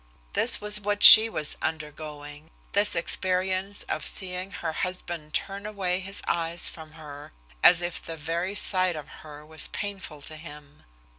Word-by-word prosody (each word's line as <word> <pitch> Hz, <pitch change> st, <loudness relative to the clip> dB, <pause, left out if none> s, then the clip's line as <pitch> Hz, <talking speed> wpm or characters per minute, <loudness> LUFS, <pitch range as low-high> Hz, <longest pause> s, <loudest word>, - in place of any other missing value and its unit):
This -, -, +1 dB
was 210 Hz, 0 st, 0 dB
what 205 Hz, 0 st, -2 dB
she 220 Hz, +1 st, +12 dB
was 150 Hz, -8 st, -3 dB
undergoing, 150 Hz, -1 st, -7 dB, 0.2 s
this 205 Hz, 0 st, +2 dB
experience 185 Hz, +3 st, 0 dB
of -, -, -4 dB
seeing 185 Hz, 0 st, -2 dB
her 165 Hz, -4 st, -5 dB
husband 175 Hz, -4 st, -5 dB
turn 200 Hz, +1 st, -4 dB
away 190 Hz, -4 st, -2 dB
his 195 Hz, +1 st, -6 dB
eyes 170 Hz, 0 st, 0 dB
from 155 Hz, -1 st, -10 dB
her, 145 Hz, -, -12 dB, 0.3 s
as 175 Hz, -1 st, +6 dB
if 175 Hz, 0 st, -4 dB
the 165 Hz, 0 st, -7 dB
very 170 Hz, +5 st, -4 dB
sight 185 Hz, -3 st, 0 dB
of 150 Hz, -2 st, -8 dB
her 150 Hz, -1 st, -12 dB
was 160 Hz, 0 st, -4 dB
painful 190 Hz, -8 st, -7 dB
to 155 Hz, -, -7 dB
him. 150 Hz, -2 st, -13 dB
170 Hz, 155 wpm, -25 LUFS, 155-190 Hz, 0.3 s, she